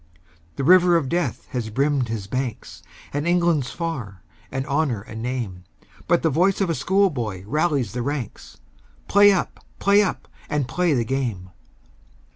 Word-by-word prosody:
The 140 - -3
river 180 +2 +6
of 140 -6 -2
death 175 +3 -1
has 120 -5 -3
brimmed 135 +2 +1
his 110 -3 -4
banks, 125 +2 -5 0.3
And 145 +3 -1
England's 170 -6 +2
far, 125 - -5 0.3
and 135 0 -3
Honour 140 -6 0
a - - -12
name, 110 -5 -4 0.4
But 170 - +2
the 160 - +2
voice 180 +7 +2
of 180 -5 +1
schoolboy 140 - 0
rallies 145 - 0
the 120 +3 -3
ranks, 135 -3 -5 0.5
"Play 205 +1 +6
up! 190 - -2
play 200 +1 +4
up! 200 - -2 0.2
and 145 -4 0
play 175 +4 +1
the 120 -2 0
game!" 110 -8 -3
140 Hz, 150 wpm, -23 LUFS, 120-170 Hz, 0.5 s, river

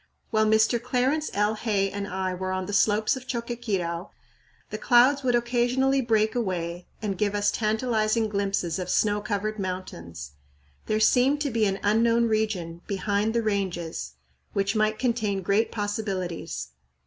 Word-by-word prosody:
While 215 -1 +3
Mr. 220 +2 +3
Clarence 260 +5 0
L. 210 +1 +2
Hay 205 -3 0
and 200 0 -4
I 185 -1 -2
were 185 +1 -3
on 185 0 -2
the 205 - -5
slopes 215 +4 +3
of 260 0 -9
Choqquequirau 210 -8 -3 0.6
the - - -4
clouds 255 +3 +5
would 250 -2 +2
occasionally 245 +3 +2
break 220 -2 +2
away 175 -6 -3 0.2
and 195 -3 -2
give 210 -1 +1
us 205 0 +2
tantalizing 220 0 +1
glimpses 195 -4 -1
of 180 0 -4
snow 210 +2 +2
covered 210 +1 -2
mountains. 85 - -6 0.6
There 215 - +1
seemed 255 +6 +4
to 285 -2 -1
be 220 -2 +2
an 195 0 -2
unknown 230 +3 +3
region, 205 -7 -1
"behind 205 +3 0
the 230 - +2
Ranges," 175 - -2 0.4
which 200 +2 0
might 215 0 +2
contain 220 -6 0
great 200 +5 +1
possibilities. 205 - -3
215 Hz, 150 wpm, -26 LUFS, 195-235 Hz, 0.6 s, clouds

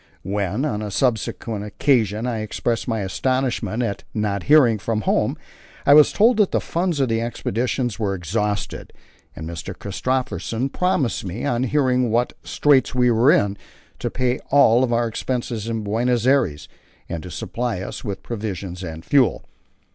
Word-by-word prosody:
When, 100 +6 -1
on 105 -7 -2
a 105 - -4
subsequent 110 -1 -1
occasion, 110 -1 +1
I 120 -3 -2
expressed 110 +2 -2
my 110 -3 -1
astonishment 120 +3 -1
at 100 -4 -3
not 105 -2 -1
hearing 130 -8 +6
from 110 +1 -1
home, - - +1 0.5
I 140 - +7
was 150 0 +7
told 225 +2 +4
that 210 -3 +4
the - - +1
funds 170 -2 -1
of 135 - +2
the 115 -1 0
Expedition 120 +2 -1
were 100 -3 0
exhausted, 105 +4 -3 0.4
and 80 - -7
Mr. 85 -1 -6
Christophersen 125 +3 -2
promised 145 -7 0
me, 95 +7 -5
on 125 -2 0
hearing 125 -3 +2
what 120 +2 +1
straits 135 -4 +2
we 125 -1 +4
were 115 +4 +4
in, 100 -5 +2 0.4
to - - -2
pay 125 0 -1
all 125 -3 +5
our 120 0 +2
expenses 115 -1 -3
in 115 -2 -2
Buenos 120 +3 0
Aires, 120 - +2 0.4
and 85 - -4
to 90 - -9
supply 115 +5 -3
us - - -6
with 95 -2 -5
provisions 100 -5 -5
and 80 -2 -7
fuel. 135 -4 +2
115 Hz, 160 wpm, -22 LUFS, 100-130 Hz, 0.5 s, I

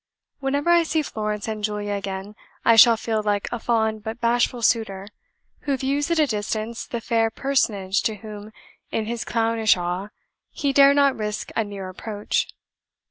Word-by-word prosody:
"Whenever 285 +4 0
I 345 0 +6
see 320 -1 0
Florence 210 -5 -3
and 215 -1 -4
Julia 205 -1 -2
again, 195 +1 -5 0.3
I 230 - +6
shall 230 +1 +8
feel 220 -1 -1
like 205 -1 -1
a 240 - -3
fond 220 -2 0
but 220 +2 -5
bashful 240 0 +1
suitor, 200 -4 +1 0.5
who 280 -2 -1
views 280 +4 -1
at 335 - +1
a 310 - +5
distance 220 -1 -3
the 235 - -3
fair 225 0 +1
personage 210 -7 0
to 220 - 0
whom, 210 0 -9 0.4
in 220 - -2
his 235 +1 -3
clownish 225 -3 +2
awe, 180 +3 -3 0.4
he 280 -2 -1
dare 280 0 +7
not 280 -2 +4
risk 210 -1 -4
a 225 - +2
near 200 -2 -7
approach. 205 +3 -2
220 Hz, 170 wpm, -23 LUFS, 210-245 Hz, 0.5 s, shall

